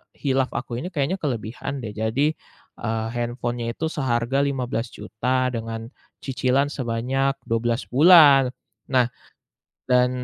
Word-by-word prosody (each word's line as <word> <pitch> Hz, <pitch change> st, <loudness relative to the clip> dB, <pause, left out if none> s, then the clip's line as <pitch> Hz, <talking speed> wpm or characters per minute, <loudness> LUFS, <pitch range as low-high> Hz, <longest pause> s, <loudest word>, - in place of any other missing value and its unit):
khilaf 135 Hz, -2 st, 0 dB
aku 120 Hz, -1 st, -4 dB
ini 180 Hz, -, -4 dB
kayaknya 155 Hz, +2 st, -1 dB
kelebihan 130 Hz, 0 st, -3 dB
deh. 105 Hz, -, -6 dB
Jadi, 115 Hz, +8 st, 0 dB, 0.5 s
eee, 110 Hz, 0 st, -2 dB
handphonenya 120 Hz, 0 st, -3 dB
itu 160 Hz, -, -2 dB
seharga 130 Hz, -1 st, 0 dB
Rp15.000.000 125 Hz, -1 st, -2 dB
dengan 115 Hz, 0 st, -4 dB, 0.4 s
cicilan 130 Hz, +1 st, +1 dB
sebanyak 135 Hz, +2 st, -1 dB
12 115 Hz, +2 st, 0 dB
bulan. 145 Hz, -2 st, +7 dB, 0.4 s
Nah, 130 Hz, -2 st, +4 dB, 0.9 s
dan 125 Hz, 0 st, +4 dB
125 Hz, 110 wpm, -23 LUFS, 115-135 Hz, 0.9 s, bulan